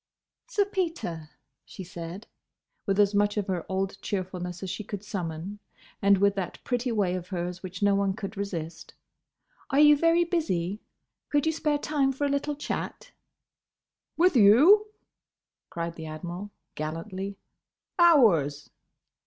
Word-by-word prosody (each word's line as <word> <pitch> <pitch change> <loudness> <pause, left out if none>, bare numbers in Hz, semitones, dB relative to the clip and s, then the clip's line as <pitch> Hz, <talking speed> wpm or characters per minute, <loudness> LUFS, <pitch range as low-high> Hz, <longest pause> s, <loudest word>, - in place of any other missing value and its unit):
"Sir 415 -5 +1
Peter," 330 - -3 0.3
she 190 - -9
said, 175 +3 -8 0.6
with 195 0 +1
as 205 0 +4
much 205 +1 +2
of 205 - 0
her 185 -4 -3
old 195 +1 -2
cheerfulness 180 -2 -4
as 190 - -3
she 215 - -5
could 205 0 -6
summon, 185 -1 -5 0.4
and 200 0 +5
with 200 +1 +3
that 190 -3 -4
pretty 245 0 -1
way 200 -5 +1
of 180 -1 -4
hers 180 -1 -4
which 185 +1 -6
no 200 0 +4
one 195 -1 +1
could 200 -1 -6
resist, 175 -5 -5 0.7
"Are 275 - +2
you 295 0 +8
very 335 +3 +3
busy? 205 - -1 0.5
Could 290 0 +2
you 320 - +3
spare 300 -2 0
time 290 -2 +1
for 270 +2 -2
a - - +1
little 280 +1 -1
chat?" 295 - -5 1.1
"With 355 -1 +4
you?" 285 - +7 0.8
cried 170 0 -4
the 160 -1 -8
Admiral, 175 +5 -6 0.2
gallantly. 185 +6 -5 0.6
"Hours!" 180 - +4
200 Hz, 145 wpm, -27 LUFS, 180-275 Hz, 1.1 s, you